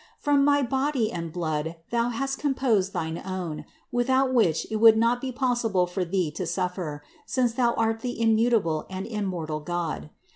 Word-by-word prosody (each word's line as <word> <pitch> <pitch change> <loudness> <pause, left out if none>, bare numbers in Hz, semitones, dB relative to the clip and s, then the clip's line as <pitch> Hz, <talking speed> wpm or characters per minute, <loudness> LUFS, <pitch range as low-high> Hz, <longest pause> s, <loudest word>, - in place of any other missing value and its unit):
From 285 -1 +2
my 285 0 +4
body 265 -2 0
and 165 -1 -4
blood 160 -1 -2 0.2
Thou 235 0 +1
hast 275 +3 -2
composed 255 -9 +1
thine 160 -1 -3
own, 175 -5 -4 0.3
without 260 +2 +2
which 175 -10 +2
it 220 - 0
would 220 0 +7
not 235 +2 +2
be 265 - -3
possible 240 -7 +1
for 180 +1 -2
Thee 180 -3 -1
to - - -4
suffer, 180 -5 -3 0.2
since 250 -3 +1
Thou 235 -1 +2
art 225 0 +1
the 245 +1 -3
im 225 -1 +2
mutable 220 -9 +1
and 190 0 -5
immortal 180 -8 -3
God. 160 - -3
220 Hz, 175 wpm, -26 LUFS, 175-245 Hz, 0.3 s, would